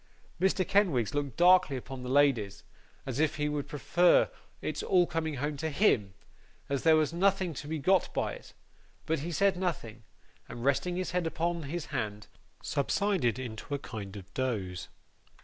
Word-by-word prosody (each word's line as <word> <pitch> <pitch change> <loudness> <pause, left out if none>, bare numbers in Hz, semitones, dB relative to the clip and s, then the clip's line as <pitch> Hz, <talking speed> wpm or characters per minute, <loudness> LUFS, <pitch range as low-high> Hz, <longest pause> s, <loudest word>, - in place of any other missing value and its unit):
Mr. 190 -1 +2
Kenwigs 170 - +2
looked 145 -4 -3
darkly 180 -5 +5
upon 130 +1 -8
the 125 - -6
ladies, 130 -8 +2 0.4
as 130 0 -4
if 155 0 +2
he 150 -1 -1
would 150 -1 -2
prefer 175 +4 +3 0.3
its - - -3
all 180 -2 +3
coming 160 -2 -2
home 145 +3 -2
to 160 +3 -2
HIM, 115 - +2 0.5
as 140 -1 -1
there 160 -1 +5
was 155 0 +1
nothing 190 -1 +1
to 145 - -7
be 160 +1 -2
got 185 +5 +2
by - - -1
it; - - -12 0.5
but 160 -1 0
he 165 +5 -4
said 195 +3 +2
nothing, 135 - -3 0.5
and 120 +1 -6
resting 160 +6 +1
his 185 -1 -2
head 180 -1 0
upon 170 +1 -1
his 160 +2 -4
hand, 105 -5 -3 0.4
subsided 140 - 0
into 125 +2 -5
a - - -1
kind 105 -7 -8
of 100 0 -12
doze. 100 -9 -3
145 Hz, 170 wpm, -30 LUFS, 125-175 Hz, 0.5 s, darkly